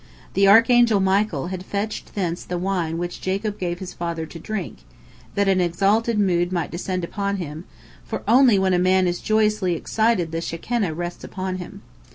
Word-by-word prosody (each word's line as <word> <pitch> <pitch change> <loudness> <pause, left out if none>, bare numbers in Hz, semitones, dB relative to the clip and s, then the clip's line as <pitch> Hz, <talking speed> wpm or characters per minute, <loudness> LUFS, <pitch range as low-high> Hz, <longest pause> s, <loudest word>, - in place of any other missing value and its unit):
The 195 0 +4
archangel 230 +1 +6
Michael 190 -5 +1
had 185 -1 -5
fetched 205 +2 -4
thence 175 -4 -2
the 180 - -4
wine 175 -3 -1
which 175 +1 -4
Jacob 200 +2 -2
gave 175 -1 -2
his 185 0 -7
father 170 -1 -4
to 165 +1 -10
drink, 215 0 -5 0.6
that 200 0 +2
an 190 -1 +3
exalted 200 +6 +1
mood 175 -3 +2
might 175 -3 -2
descend 185 +1 -3
upon 200 +3 -2
him, 160 -1 -6 0.4
for - - -5
only 245 -3 +6
when 190 -1 +2
a 180 - +3
man 185 +1 +3
is 175 0 -1
joyously 215 -4 +1
excited 215 -2 0
the 165 0 -2
Shekinah 175 +1 -2
rests 175 +1 -5
upon 185 -1 -4
him. 180 - -9
185 Hz, 180 wpm, -22 LUFS, 175-205 Hz, 0.6 s, archangel